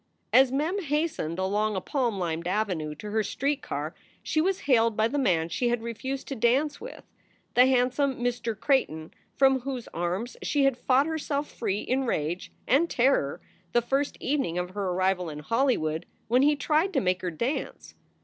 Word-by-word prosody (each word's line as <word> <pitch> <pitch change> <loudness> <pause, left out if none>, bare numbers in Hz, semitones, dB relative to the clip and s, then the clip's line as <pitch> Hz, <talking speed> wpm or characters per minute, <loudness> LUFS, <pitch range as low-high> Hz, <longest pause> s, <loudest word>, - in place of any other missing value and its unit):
As 260 0 +6
Mem 320 +9 0
hastened 295 - -1
along 205 +3 0
a - - 0
palm 240 +1 -1
lined 170 -2 -2
avenue 180 -6 -1
to 210 +3 -8
her 220 +1 +2
street 280 +6 -1
car - - -4 0.3
she 310 - +1
was 380 +3 0
hailed 230 -5 +3
by 220 +1 +3
the 285 +5 -1
man 170 -10 +2
she 240 +8 0
had 240 -1 -1
refused 260 +4 -4
to 275 - -3
dance 270 +6 +1
with, - - -9 0.5
the 250 +1 +6
handsome 260 +2 +2
Mr. 240 -3 -2
Creighton 225 - 0 0.2
from 265 -1 +4
whose 255 -2 -5
arms 180 +8 -3
she 290 -2 +1
had 275 -2 +3
fought 260 +2 +3
herself 300 -2 -2
free 205 -2 -2
in 265 +1 0
rage 170 -5 -2 0.2
and 300 +7 +3
terror 245 - +1 0.3
the 240 - +4
first 275 +4 -1
evening 270 - -1
of 180 0 -2
her 200 +1 -3
arrival 180 -1 0
in 150 - -7
Hollywood 160 - 0 0.2
when 245 +3 +4
he 295 +2 +4
tried 315 +6 +1
to 275 - +3
make 185 -3 0
her 180 - -2
dance. 235 - -4
240 Hz, 180 wpm, -27 LUFS, 185-275 Hz, 0.5 s, As